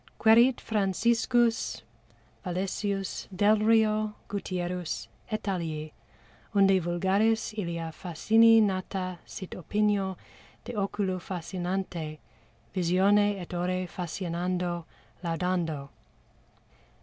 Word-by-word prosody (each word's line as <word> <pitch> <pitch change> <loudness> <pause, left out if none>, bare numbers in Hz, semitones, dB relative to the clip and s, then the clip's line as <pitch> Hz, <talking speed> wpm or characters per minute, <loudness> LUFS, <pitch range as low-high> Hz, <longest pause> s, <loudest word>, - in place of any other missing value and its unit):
"Quærit 235 +3 +6
Franciscus 225 +3 +1 0.6
Valesius, 195 +2 -2
Delrio, 215 +2 +3
Gutierrus, 180 -3 -3 0.2
et 215 -1 -3
alii, 160 -5 -3 0.6
unde 195 -1 +5
vulgaris 195 +7 +1
ilia 170 -5 -3
fascini 220 +7 +4
nata 185 -2 -2
sit 190 - -8
opinio 200 0 0 0.5
de 245 - -6
oculo 195 -2 -1
fascinante 175 -2 -4 0.6
visione 195 +3 +3
et 180 0 -8
ore 180 +1 -1
fascinando 175 0 -3 0.4
laudando." 165 -4 -1
190 Hz, 80 wpm, -28 LUFS, 175-210 Hz, 0.6 s, Quærit